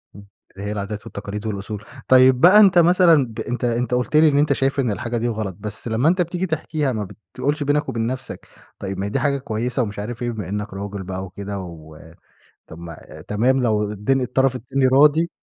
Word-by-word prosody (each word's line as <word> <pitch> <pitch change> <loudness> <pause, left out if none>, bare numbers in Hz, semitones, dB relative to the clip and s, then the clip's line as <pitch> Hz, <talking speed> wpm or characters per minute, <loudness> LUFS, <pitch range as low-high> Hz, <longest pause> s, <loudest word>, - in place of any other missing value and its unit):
إمم، 100 0 -12 0.3
اللي 100 +1 -6
هي - - -3
العادات 105 0 -5
والتقاليد 100 +1 -7
والأصول. 105 0 -5 0.2
طيب 130 0 +5
بقى 185 +5 +8
أنت 190 -4 +6
مثلًا 170 -4 +5
ب 110 - -10
أنت 125 +1 -4
أنت 120 +1 -1
قُلت 125 +4 -1
لي 155 +1 +6
إن 140 - +1
أنت 145 -1 +3
شايف 135 +1 0
إن 125 -5 +1
الحاجة 115 +3 -3
دي 115 +1 -1
غلط، 110 -5 -3
بس 105 +2 -6
لمّا 115 +7 +2
أنت 180 +1 +2
بتيجي 175 +2 -2
تحكيها 155 -4 -2
ما 105 -4 -3 0.3
بتقولش 145 +1 -1
بينك 145 +1 0
وبين 115 0 -2
نَفْسك، 130 +1 -6 0.3
طيب 95 -1 -5
ما 95 - -3
هي - - -3
دي - - -1
حاجة 140 -1 +1
كويسة 125 +1 -2
ومش 105 -2 -6
عارف 115 +4 -6
إيه، 120 - -1
بما 105 -6 -6
إنّك 105 +1 -4
راجل 100 0 -6
بقى 95 0 -5
وكده 100 +1 -6
و 80 -4 -10 0.7
طَب 80 - -12
ما 85 -1 -9 0.3
تمام 125 +5 +1
لو 110 -3 +1
الدن 105 +6 0
الطرف 130 +1 +1
التاني 130 +3 0
راضي؟ 150 +5 +4
120 Hz, 215 wpm, -21 LUFS, 105-140 Hz, 0.7 s, بقى